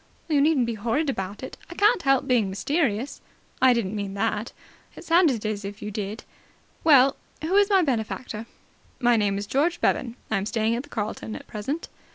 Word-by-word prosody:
"You 300 Hz, -4 st, +3 dB
needn't 290 Hz, -4 st, +3 dB
be 235 Hz, -, -2 dB
horrid 240 Hz, +8 st, 0 dB
about 195 Hz, 0 st, -5 dB
it. 260 Hz, -, -7 dB
I 345 Hz, -, -8 dB
can't 420 Hz, +1 st, +4 dB
help 270 Hz, -2 st, +3 dB
being 240 Hz, -7 st, +2 dB
mysterious." 255 Hz, -, -1 dB, 0.4 s
"I 260 Hz, 0 st, +7 dB
didn't 220 Hz, -4 st, 0 dB
mean 200 Hz, -1 st, -4 dB
that." 220 Hz, +2 st, -1 dB, 0.4 s
"It -, -, -10 dB
sounded 325 Hz, -, +3 dB
as 215 Hz, -1 st, -2 dB
if 200 Hz, +1 st, -7 dB
you 210 Hz, -, -4 dB
did. 210 Hz, +1 st, -5 dB, 0.6 s
Well, 275 Hz, -4 st, +6 dB, 0.3 s
who 340 Hz, +5 st, 0 dB
is 405 Hz, 0 st, +5 dB
my 385 Hz, -3 st, +5 dB
benefactor?" 230 Hz, -3 st, -3 dB, 0.5 s
"My 240 Hz, -1 st, +4 dB
name 205 Hz, -3 st, +1 dB
is 200 Hz, -, -3 dB
George 305 Hz, +10 st, +1 dB
Bevan. 235 Hz, -2 st, 0 dB, 0.2 s
I 220 Hz, -, +2 dB
am 195 Hz, +1 st, -2 dB
staying 225 Hz, 0 st, 0 dB
at 240 Hz, -, -2 dB
the 290 Hz, -, -16 dB
Carlton 220 Hz, -1 st, -4 dB
at -, -, -9 dB
present." 270 Hz, +10 st, -4 dB
235 Hz, 195 wpm, -25 LUFS, 210-290 Hz, 0.6 s, I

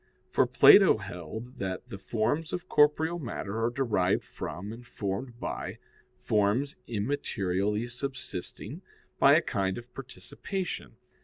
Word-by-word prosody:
For -, -, +3 dB
Plato -, -, +8 dB
held 110 Hz, -, -8 dB
that 95 Hz, -1 st, -4 dB
the 100 Hz, -, -7 dB
forms 135 Hz, +11 st, -1 dB
of 180 Hz, 0 st, -4 dB
corporeal 160 Hz, +3 st, +3 dB
matter 115 Hz, -5 st, -3 dB
are 115 Hz, -, +3 dB
derived 115 Hz, -8 st, +1 dB
from, 100 Hz, +5 st, -6 dB
and 120 Hz, +2 st, -10 dB
formed 115 Hz, +2 st, -4 dB
by, -, -, -4 dB, 0.4 s
forms 120 Hz, +4 st, +1 dB
immaterially 105 Hz, -3 st, -1 dB
subsisting, 125 Hz, -7 st, -6 dB, 0.4 s
by -, -, +7 dB
a -, -, +4 dB
kind 95 Hz, -1 st, -1 dB
of 120 Hz, +1 st, -10 dB
participation. 180 Hz, +8 st, -5 dB
115 Hz, 125 wpm, -29 LUFS, 100-135 Hz, 0.4 s, Plato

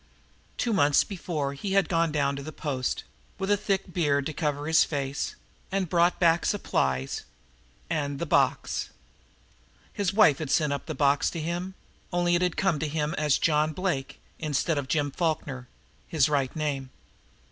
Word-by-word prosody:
Two 235 Hz, -, 0 dB
months 145 Hz, -6 st, +4 dB
before 160 Hz, -7 st, -3 dB
he 190 Hz, +8 st, -4 dB
had 195 Hz, -1 st, +3 dB
gone 165 Hz, -2 st, +1 dB
down 140 Hz, -2 st, +1 dB
to 140 Hz, -, -5 dB
the 155 Hz, +3 st, -7 dB
post, 135 Hz, -5 st, -2 dB, 0.3 s
with 195 Hz, +1 st, -1 dB
a -, -, +6 dB
thick 195 Hz, -2 st, -2 dB
beard 145 Hz, -5 st, +1 dB
to 155 Hz, -, -3 dB
cover 150 Hz, -2 st, -2 dB
his 160 Hz, +1 st, +5 dB
face, 140 Hz, -2 st, -3 dB, 0.4 s
and 195 Hz, 0 st, +1 dB
had 180 Hz, -, -6 dB
brought 175 Hz, 0 st, +3 dB
back 170 Hz, -1 st, +4 dB
supplies 65 Hz, -, 0 dB, 0.7 s
and 145 Hz, -4 st, -2 dB
the 170 Hz, -, -2 dB
box. -, -, +1 dB, 1.0 s
His 200 Hz, -3 st, 0 dB
wife 195 Hz, -9 st, +5 dB
had 155 Hz, -4 st, -4 dB
sent 150 Hz, 0 st, +2 dB
up 140 Hz, -, -5 dB
the -, -, -4 dB
box 140 Hz, 0 st, +3 dB
to 170 Hz, -, -5 dB
him, 175 Hz, +4 st, -3 dB, 0.4 s
only 175 Hz, -1 st, +2 dB
it 175 Hz, -, +3 dB
had 180 Hz, -2 st, 0 dB
come 190 Hz, -6 st, +1 dB
to 155 Hz, -, -1 dB
him 150 Hz, 0 st, -1 dB
as 150 Hz, -2 st, +3 dB
"John 155 Hz, 0 st, +2 dB
Blake" 155 Hz, -7 st, -2 dB, 0.2 s
instead 155 Hz, +1 st, 0 dB
of 135 Hz, -, -5 dB
Jim 145 Hz, -1 st, 0 dB
Falkner, 145 Hz, -6 st, -2 dB, 0.4 s
his 150 Hz, -6 st, +3 dB
right 140 Hz, -3 st, 0 dB
name. 140 Hz, -4 st, -2 dB
155 Hz, 175 wpm, -27 LUFS, 140-175 Hz, 1.0 s, a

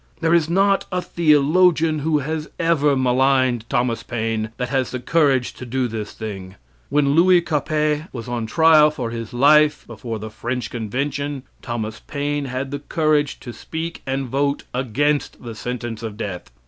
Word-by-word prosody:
There 165 Hz, -1 st, +2 dB
is 165 Hz, -2 st, +3 dB
not 195 Hz, +2 st, +2 dB
a 180 Hz, -, 0 dB
theologian 160 Hz, 0 st, +3 dB
who 155 Hz, +1 st, +1 dB
has 155 Hz, +2 st, -3 dB
ever 150 Hz, -4 st, +2 dB
maligned 130 Hz, -2 st, +2 dB
Thomas 120 Hz, -1 st, 0 dB
Paine 110 Hz, -2 st, -2 dB
that 125 Hz, -1 st, -3 dB
has 130 Hz, -1 st, 0 dB
the 125 Hz, -, -4 dB
courage 135 Hz, -2 st, +2 dB
to -, -, -10 dB
do 125 Hz, +1 st, -1 dB
this 110 Hz, -2 st, -5 dB
thing. 95 Hz, -4 st, -7 dB, 0.3 s
When 145 Hz, 0 st, +2 dB
Louis 180 Hz, +3 st, +6 dB
Capet 155 Hz, -1 st, -1 dB
was 115 Hz, -2 st, -7 dB
on 120 Hz, -2 st, -3 dB
trial 155 Hz, +4 st, +6 dB
for 125 Hz, -6 st, -4 dB
his 115 Hz, 0 st, -6 dB
life 150 Hz, +4 st, +4 dB
before 115 Hz, 0 st, -6 dB
the 110 Hz, 0 st, -7 dB
French 120 Hz, +2 st, -4 dB
convention, 135 Hz, +4 st, -3 dB, 0.2 s
Thomas 115 Hz, -2 st, -4 dB
Paine 145 Hz, 0 st, -3 dB
had 130 Hz, +1 st, -4 dB
the 145 Hz, -, -3 dB
courage 150 Hz, -1 st, 0 dB
to 120 Hz, -, -8 dB
speak 165 Hz, +5 st, -6 dB
and 135 Hz, 0 st, -2 dB
vote 140 Hz, +3 st, 0 dB
against 135 Hz, +5 st, -1 dB
the 115 Hz, -1 st, -6 dB
sentence 120 Hz, +1 st, -5 dB
of 110 Hz, -3 st, -6 dB
death. 100 Hz, -5 st, -5 dB
135 Hz, 165 wpm, -21 LUFS, 120-150 Hz, 0.3 s, Louis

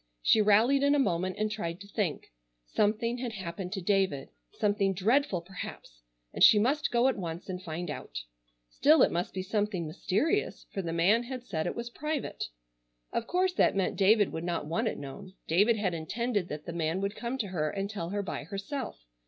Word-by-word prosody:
She 220 Hz, -, +5 dB
rallied 220 Hz, +7 st, +5 dB
in 285 Hz, +1 st, +4 dB
a -, -, +3 dB
moment 185 Hz, -8 st, +1 dB
and 215 Hz, 0 st, 0 dB
tried 170 Hz, -5 st, -4 dB
to 200 Hz, -, -10 dB
think. 200 Hz, -, -2 dB, 0.3 s
Something 225 Hz, -, 0 dB
had 240 Hz, -2 st, -3 dB
happened 180 Hz, -2 st, -5 dB
to 190 Hz, -3 st, -4 dB
David. 190 Hz, -7 st, +1 dB, 0.2 s
Something 205 Hz, -2 st, +1 dB
dreadful, 210 Hz, 0 st, +2 dB
perhaps, 170 Hz, -, -9 dB, 0.3 s
and -, -, +2 dB
she 215 Hz, -, +9 dB
must 275 Hz, +8 st, +2 dB
go 240 Hz, +2 st, +3 dB
at 265 Hz, -, 0 dB
once 170 Hz, -1 st, -5 dB
and 185 Hz, -1 st, -5 dB
find 175 Hz, 0 st, -5 dB
out. -, -, -6 dB, 0.4 s
Still -, -, +5 dB
it -, -, +3 dB
must 175 Hz, +2 st, -1 dB
be 185 Hz, -, -4 dB
something 205 Hz, -3 st, -1 dB
mysterious, 210 Hz, -, -1 dB
for 195 Hz, -, -1 dB
the 170 Hz, -3 st, -3 dB
man 180 Hz, +8 st, +4 dB
had 255 Hz, 0 st, -6 dB
said 160 Hz, -7 st, -2 dB
it -, -, -3 dB
was 235 Hz, 0 st, -5 dB
private. 300 Hz, +2 st, -3 dB, 0.7 s
Of 230 Hz, -, -1 dB
course 365 Hz, +1 st, +1 dB
that 355 Hz, -, +3 dB
meant 195 Hz, -1 st, 0 dB
David 205 Hz, +1 st, +4 dB
would 160 Hz, -, -4 dB
not 170 Hz, -3 st, -2 dB
want 220 Hz, +10 st, 0 dB
it -, -, -2 dB
known. 185 Hz, +7 st, -9 dB
David 205 Hz, +8 st, +4 dB
had 195 Hz, -4 st, 0 dB
intended 205 Hz, +4 st, -1 dB
that 150 Hz, -2 st, -6 dB
the 170 Hz, -, -5 dB
man 165 Hz, +1 st, -1 dB
would 200 Hz, +1 st, -1 dB
come 240 Hz, +2 st, -3 dB
to 215 Hz, -6 st, -2 dB
her 155 Hz, -4 st, -1 dB
and 195 Hz, +4 st, -2 dB
tell 200 Hz, -5 st, -5 dB
her 205 Hz, +1 st, -2 dB
by -, -, -5 dB
herself. 200 Hz, -, -5 dB
200 Hz, 200 wpm, -30 LUFS, 170-230 Hz, 0.7 s, she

